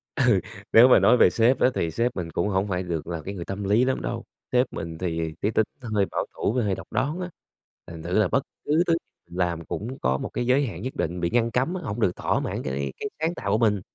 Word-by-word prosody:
Ừ, 130 - +2 0.5
nếu 115 +3 +9
mà 130 - +7
nói 125 - +5
về - - +7
sếp 120 +3 +3
á - - +5
thì 80 - 0
sếp 115 +9 0
mình 85 -3 -4
cũng 85 - 0
hổng 95 +1 +1
phải 90 -1 -1
được 85 -4 -4
là 85 -2 -4
cái 100 - -4
người 85 - -5
tâm 95 +1 -4
lý 105 +6 +3
lắm 130 - 0
đâu. - - -4 0.3
Sếp 125 0 +2
mình 80 0 -5
thì 80 -2 -2
cái 105 - +1
tính 110 -1 +2
nó 120 - -7
hơi 100 -2 +3
bảo - - -2
thủ 110 - -1
với 125 -3 +1
hơi 100 -2 0
độc 95 - -9
đoán 145 +7 -1
á, 180 -1 -4 0.6
thành 80 -1 -9
thử 90 +5 +1
là 105 - +4
bất 135 - +1 0.2
cứ 155 +4 +3
thứ 165 - +4 0.4
mình 90 - -9
làm 85 -2 0
cũng 120 +6 -5
có 65 +1 +1
một - - -4
cái 120 - -2
giới 135 +3 +4
hạn 90 -3 -6
nhất 130 +3 -5
định 85 +2 -2
bị 85 - +1
ngăn 115 +1 +1
cấm 130 +9 +1
á, 185 - -4
hổng 100 -2 -4
được 90 -4 +2
thỏa - - 0
mãn - - -3
cái 70 +1 -3
cái 210 - -3
sáng 160 +2 0
tạo 100 - -3
của 105 - +4
mình. 105 -4 +2
105 Hz, 280 wpm, -25 LUFS, 85-125 Hz, 0.6 s, nếu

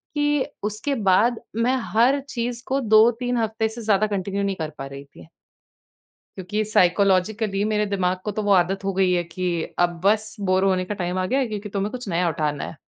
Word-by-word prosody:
कि 295 -1 +1 0.2
उसके 215 +7 -2
बाद 225 +6 +3 0.2
मैं 235 +3 +2 0.2
हर 245 +6 +4
चीज़ 240 -1 -3
को 270 +1 0
2-3 235 +2 +3
हफ़्ते 220 0 0
से 230 +2 -8
ज़्यादा 215 -1 +2
कंटिन्यू 200 0 -2
नहीं 195 -1 -1
कर 160 -3 -4
पा 135 - -4
रही 140 0 -9
थी। 85 -11 -16 1.1
क्योंकि 200 +4 -2
साइकोलॉजिकली 200 +1 +2
मेरे 210 -1 +1
दिमाग 185 -2 0
को 210 - -1
तो 215 - -3
वो 205 - +1
आदत 190 +2 +2
हो 195 0 -1
गई 190 -1 +2
है 175 -1 +1
कि 175 +2 -6 0.3
अब 175 -1 +1
बस, 210 +1 +1
बोर 190 -1 +1
होने 185 -1 +1
का 210 - -3
टाइम 180 -1 -3
आ 185 - 0
गया 260 +8 +1
है 265 - 0
क्योंकि 210 -1 -5
तुम्हें 200 +1 -2
कुछ 250 -1 -7
नया 175 0 +1
उठाना 150 -2 -2
है। - - -7
205 Hz, 205 wpm, -23 LUFS, 185-225 Hz, 1.1 s, हर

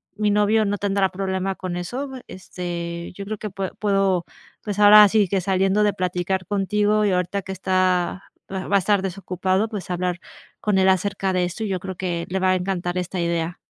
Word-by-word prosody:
mi 210 0 +1
novio 210 +1 +3
no 205 0 -1
tendrá 195 -1 +1
problema 190 0 -2
con 185 -2 -5
eso, 245 +11 -4
me 260 -2 -9
este, 170 -2 -6
yo 200 - -6
creo 215 +1 -4
que 215 - -5
pue 190 0 -4
puedo, 195 -4 +1 0.4
pues 205 -2 -4
ahora 210 0 +9
sí 210 -2 +3
que, 195 - +1
saliendo 195 +2 +1
de 205 - +2
platicar 180 +1 -2
contigo 210 +2 +1
y 200 - +2
ahorita 180 +2 -1
que 190 - -8
está 185 -1 0 0.3
va 190 -1 -4
va 200 - +2
a - - +3
estar 200 +1 +2
desocupado, 190 +2 -1
pues, 205 -5 -6
hablar 180 0 -2 0.4
con 210 -2 +1
él 190 0 +4
acerca 190 0 0
de 180 -1 +1
eso, 180 +5 -5
y - - -1
yo 185 - -1
creo 190 0 -6
que 175 -2 -2
le 190 +2 -1
va 185 0 +3
a - - +3
encantar 180 -1 -2
esta 180 0 -3
idea. 170 0 -1
190 Hz, 210 wpm, -22 LUFS, 180-205 Hz, 0.4 s, ahora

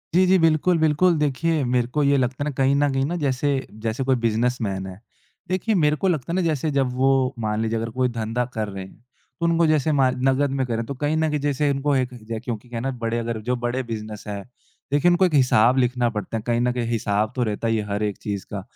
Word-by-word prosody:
जी, 185 +1 +5
जी। 190 +1 +5
बिल्कुल, 165 +2 +3
बिल्कुल, 160 +3 +3
देखिए, 150 +2 0
मेरे 125 -1 +1
को 150 +4 -1
ये 140 0 +3
लगता 130 +2 -1
है - - -3
ना, - - -3
कहीं 135 +1 +3
न 145 0 +2
कहीं 135 0 0
ना 170 +5 -2
जैसे 140 +2 0 0.4
जैसे 115 +4 -1
कोई 130 0 +2
बिज़नेसमैन 110 -4 0
है। 95 +1 -9 0.5
देखिए, 190 +4 0
मेरे 150 -4 +3
को 190 - -1
लगता 165 -4 -1
है 175 - -1
ना 185 - +2
जैसे 155 -3 0
जब 135 -3 0
वो, 130 0 +2
मान 110 -1 -1
लीजिए 115 0 -1
अगर 115 +1 -3
कोई 125 +2 0
धंधा 115 +1 -2
कर 110 -1 -2
रहे 95 -1 -6
हैं। - - -15 0.5
तो 170 - 0
उनको 170 0 +3
जैसे 155 -1 +2
मार 135 -3 +2
नगद 135 +1 +2
में 135 -1 0
कर 120 - -3
रहे, 115 - -1
तो 140 - -5
कहीं 145 +3 -1
न 160 0 +1
कहीं 150 0 -1
जैसे 145 0 0
उनको 140 +1 0
एक 130 -1 0
ज 115 -2 -13
क्योंकि 115 0 -5
क्या 120 - -5
है - - -3
ना, 135 - -1
बड़े 115 -2 -3
अगर, 115 -1 -3
जो 125 +3 -1
बड़े 120 +2 -2
बिज़नेस 110 -3 -6
है 100 -1 -4 0.5
देखिए, 145 +4 +4
उनको 180 +2 +4
एक 175 - 0
हिसाब 125 -3 +4
लिखना 125 -1 +2
पड़ता 115 0 -4
है - - -4
कहीं 120 0 +1
न 125 - +2
कहीं 120 -2 -2
हिसाब 110 -2 0
तो 125 - +1
रहता 110 0 -2
ही 115 0 +1
है 105 - -1
हर 100 +1 -1
एक 105 -2 -2
चीज़ 100 -2 -5
का। 100 - -3
130 Hz, 260 wpm, -23 LUFS, 115-145 Hz, 0.5 s, जी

